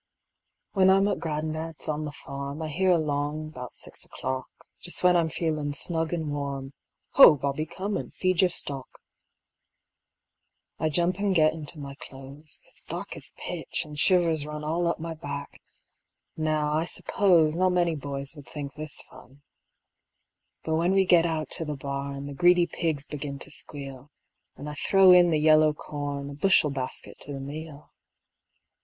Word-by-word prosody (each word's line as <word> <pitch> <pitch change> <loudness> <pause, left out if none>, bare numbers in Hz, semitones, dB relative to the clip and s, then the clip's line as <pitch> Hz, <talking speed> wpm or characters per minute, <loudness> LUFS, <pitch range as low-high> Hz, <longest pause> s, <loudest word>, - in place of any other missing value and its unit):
When 190 -2 +4
I'm 195 +1 +5
at - - 0
gran'dad's 155 0 -4
on 155 0 -1
the 150 - -4
farm, 140 +1 -6
I 155 - -3
hear 185 +5 +1
along 155 -2 0
'bout 125 -4 -8
six - - -5
o'clock, 130 0 -4 0.3
Just 175 - -4
when 180 0 +6
I'm 165 -2 +3
feelin' 150 -1 -1
snug 160 +2 -1
an' 160 -3 -2
warm, 140 -1 -4 0.4
"Ho, 270 - +9
Bobby, 140 +3 -2
come 195 +5 -3
and - - -6
feed 185 -2 +1
your 185 - +5
stock." 135 -6 -5 1.8
I 155 - +1
jump 175 +4 +2
an' 200 -1 +1
get 155 -3 +4
into 160 0 -5
my 140 -2 -7
clothes; 135 +2 -10
It's - - -8
dark - - -5
as - - -6
pitch, - - -3
an' 150 - -11
shivers 165 0 +3
run 150 0 -6
All 165 +3 0
up 170 - 0
my 165 0 -4
back. 145 -2 -7 0.7
Now, 155 -1 0
I 160 +2 +1
suppose 170 -4 +2
Not 185 +2 +3
many 175 -2 +2
boys 140 0 -5
would 145 -2 -12
think 145 -2 -6
this 150 0 -6
fun. 130 +2 -17 1.2
But 160 0 0
when 175 +3 +2
we 195 0 +4
get 170 -2 +5
out 160 -2 -2
to 165 - 0
the 150 -2 -4
barn 140 0 -4
The 145 - -6
greedy 175 +4 +5
pigs 155 -5 -2
begin 145 -2 -5
to 165 - -8
squeal, 140 -2 -6 0.5
An' 145 - -7
I 150 - -4
throw 190 +4 +5
in 180 -1 +7
the 160 - +2
yellow 155 0 +5
corn, 145 -1 -5
A - - -7
bushel 150 -1 +3
basket 130 -2 -5
to 145 - -8
the 135 - -5
meal. 150 +2 -8
155 Hz, 170 wpm, -27 LUFS, 140-170 Hz, 1.8 s, Ho